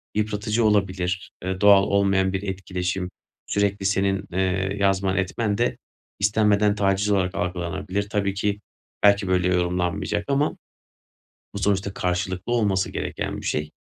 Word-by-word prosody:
yıpratıcı 105 +1 0
olabilir, 95 -3 0
ııı, 95 0 -3
doğal 100 -1 +7
olmayan 95 -1 +2
bir 95 +1 -2
etkileşim, 95 -1 -3 0.4
sürekli 100 -1 0
senin, 95 0 +1
eee, 95 +1 0
yazman 95 -1 +1
etmen 100 +2 -1
de, - - 0 0.4
istenmeden 105 0 +3
taciz 100 0 +1
olarak 95 -2 +1
algılanabilir. 90 +2 -3
Tabii 100 -1 0
ki, 100 +1 -1 0.4
belki 100 -1 +5
böyle 90 -1 +2
yorumlanmayacak 90 +3 -1
ama 140 +2 +1 1.0
bu 100 - -4
sonuçta 100 0 0
karşılıklı 90 +3 -2
olması 100 -5 +1
gereken - - -4
bir - - -9
şey. 75 0 -1
95 Hz, 130 wpm, -24 LUFS, 95-100 Hz, 1.0 s, doğal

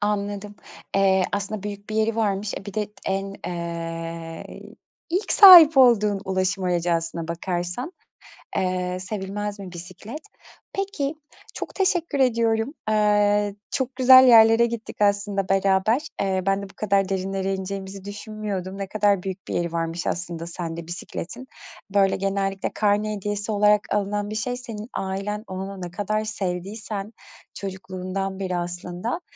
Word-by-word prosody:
Anladım. 205 0 -2 0.4
Eee, 190 -1 +4
aslında 205 0 -3
büyük 205 0 -7
bir - - -3
yeri 220 +1 +1
varmış. 205 -2 0
E, - - -14
bir 200 -1 -8
de 210 -1 -2
en 195 +1 -2
eee, 165 -1 -5 0.5
ilk 375 +5 0
sahip 345 -7 +10
olduğun 215 -6 +5
ulaşım 190 0 0
aracı 175 -1 +1
aslına 165 0 -2
bakarsan, 175 - -3 0.7
eee, 185 -1 -1
sevilmez 205 +1 -4
mi 190 -2 -8
bisiklet? 185 - -8 0.5
Peki, 390 -8 -2 0.4
çok - - -6
teşekkür 350 -6 +1
ediyorum. 230 0 +2 0.2
Eee, 205 -1 +3 0.2
çok 260 -1 -2
güzel 260 0 +8
yerlere 225 0 +7
gittik 230 -2 -6
aslında 200 -1 +1
beraber. 195 +5 +3 0.2
Eee, 190 -1 0
ben 195 0 +1
de 200 - -8
bu - - -17
kadar 200 -2 +1
derinlere 195 0 -1
ineceğimizi 190 0 -6
düşünmüyordum. 205 -2 -5
Ne 195 -1 -4
kadar 205 -2 +2
büyük 190 0 -6
bir - - -4
yeri 170 -1 -1
varmış 165 +1 -2
aslında 170 -1 -3
sende 170 -1 -6
bisikletin. 185 +7 -6 0.5
Böyle, 195 -1 +4
genellikle 195 0 -1
karne 210 0 +1
hediyesi 205 +1 -3
olarak 210 0 +4
alınan 205 0 -1
bir 215 - -5
şey, 245 +3 -2
senin 225 -3 -8
ailen 195 +2 -3
onunu 190 +1 -6
ne 175 -1 -6
kadar 215 +3 -1
sevdiysen, 200 +1 -4 0.4
çocukluğundan 190 0 -5
beri 185 -2 -2
aslında, 175 - -4
200 Hz, 140 wpm, -24 LUFS, 185-215 Hz, 0.7 s, sahip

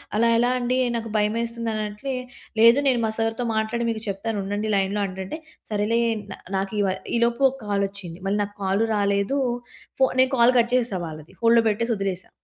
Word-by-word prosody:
అలా 230 +2 +3
ఎలా 240 +2 +3
అండి 250 0 0 0.2
నాకు 230 -1 -3
భయమేస్తుంది 230 +2 0
అన్నట్లే. 215 +5 -3 0.5
"లేదు, 230 +3 +7
నేను 255 -3 +3
మా - - 0
సర్‌తో 225 +1 -1
మాట్లాడి 220 +2 -1
మీకు 220 -1 -2
చెప్తానుండండి 205 +1 -2
లైన్‌లో" 195 +1 0
అంటంటే 190 +8 -6 0.3
సరేలే 215 +2 +1 0.3
నా - - -7 0.2
నాకు 195 +2 -2
ఇవ 200 - +2 0.3
ఈలోపు 235 +3 +1
ఓ - - -8
కాలొచ్చింది. 200 -4 -3
మళ్ళీ 205 +2 +1
నాకు 205 0 -8
కాల్ 195 +3 +1
రాలేదు. 200 +6 +1 0.6
ఫో 265 - +6
నేను 260 +1 +4
కాల్ 235 +1 +6
కట్ 235 +1 +1
చేశా 230 -7 -1
వాళ్ళది. 155 0 -10
హోల్డ్‌లో 230 0 +5
పెట్టేసొదిలేసా. 205 -4 -2
220 Hz, 165 wpm, -24 LUFS, 200-235 Hz, 0.6 s, లేదు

